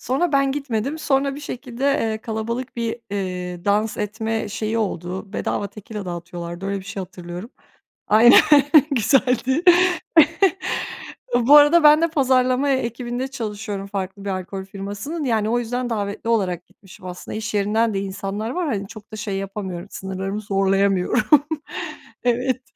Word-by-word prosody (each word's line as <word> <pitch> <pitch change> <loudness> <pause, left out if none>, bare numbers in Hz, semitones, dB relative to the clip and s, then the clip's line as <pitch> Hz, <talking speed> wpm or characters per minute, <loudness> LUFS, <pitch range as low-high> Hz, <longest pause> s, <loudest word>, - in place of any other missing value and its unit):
Sonra 290 +5 0
ben 275 -1 +3
gitmedim. 275 +1 -2
Sonra 275 -2 +1
bir 290 - -8
şekilde, 255 -2 -6
eee, 225 -6 +1
kalabalık 230 +3 -4
bir, 230 0 -2 0.2
ııı, 180 -2 -4
dans 210 +2 +1
etme 220 +1 -2
şeyi 215 +2 -2
oldu. 190 -1 -4
Bedava 205 - -2
tekila 210 +1 -8
dağıtıyorlardı. 175 +1 -6
Öyle 200 0 -1
bir - - -13
şey 200 0 -6
hatırlıyorum. 180 +3 -8 0.6
Aynen, 230 +3 +8 0.5
güzeldi. 255 - +2 1.7
Bu 245 +5 +7
arada 295 +3 +6
ben 300 +1 +7
de 335 - +4
pazarlama 260 -2 +2
e 275 - +4
ekibinde 240 +1 -3
çalışıyorum 210 -5 -5
farklı 195 0 -5
bir - - -2
alkol 190 0 -4
firmasının. 200 - -5
Yani, 220 -3 +1
o 240 +1 +2
yüzden 245 +1 -3
davetli 210 0 -3
olarak 185 -6 0
gitmişim 190 -1 -16
aslında. 180 +3 -6
İş 220 0 -4
yerinden 215 +2 +1
de 195 - -1
insanlar 195 +2 -4
var. 355 +3 -2
Hani, 200 -7 -2
çok 215 +1 -13
da - - -3
şey 210 -2 -3
yapamıyorum, 195 -2 -5
sınırlarımı 190 +2 -4
zorlayamıyorum. 195 +2 +1 1.0
Evet. 250 +1 +1
215 Hz, 145 wpm, -22 LUFS, 195-250 Hz, 1.7 s, Aynen